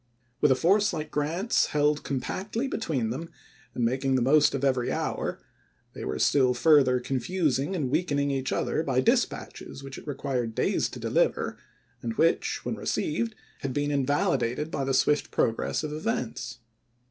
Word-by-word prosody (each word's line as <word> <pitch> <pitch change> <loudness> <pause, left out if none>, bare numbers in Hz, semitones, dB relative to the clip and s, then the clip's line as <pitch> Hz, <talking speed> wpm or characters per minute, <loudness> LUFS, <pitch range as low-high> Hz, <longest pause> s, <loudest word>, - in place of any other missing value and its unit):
With 150 - +5
a - - +6
force 195 +10 +3
like 155 0 -4
Grant's 165 +9 +1
held 150 0 +1
compactly 190 - -3
between 140 - -1
them 165 +7 -5 0.5
and 120 - +1
making 130 +2 +1
the 125 - +2
most 145 +2 +4
of 140 - -3
every 130 -3 +1
hour, - - -2 0.5
they - - -7
were 65 0 -2
still 130 - +3
further 130 -1 +5
confusing 135 +4 -1
and 140 -8 -1
weakening 145 -3 +1
each 135 -1 -2
other - - 0
by 135 -5 +1
dispatches 130 +1 -1
which 135 -1 -8
it - - -16
required 130 -5 -2
days - - +1
to - - -8
deliver - - +1 0.5
and 115 -1 -3
which, 165 +6 +1
when - - -2
received, 230 -9 -1 0.2
had 135 -2 -3
been 145 +1 0
invali 145 +7 +1
dated 140 +7 -2
by 140 - -1
the 135 0 +1
swift 145 +2 +2
progress 115 +6 0
of 150 -1 -3
events. 155 - -3
140 Hz, 165 wpm, -27 LUFS, 130-155 Hz, 0.5 s, a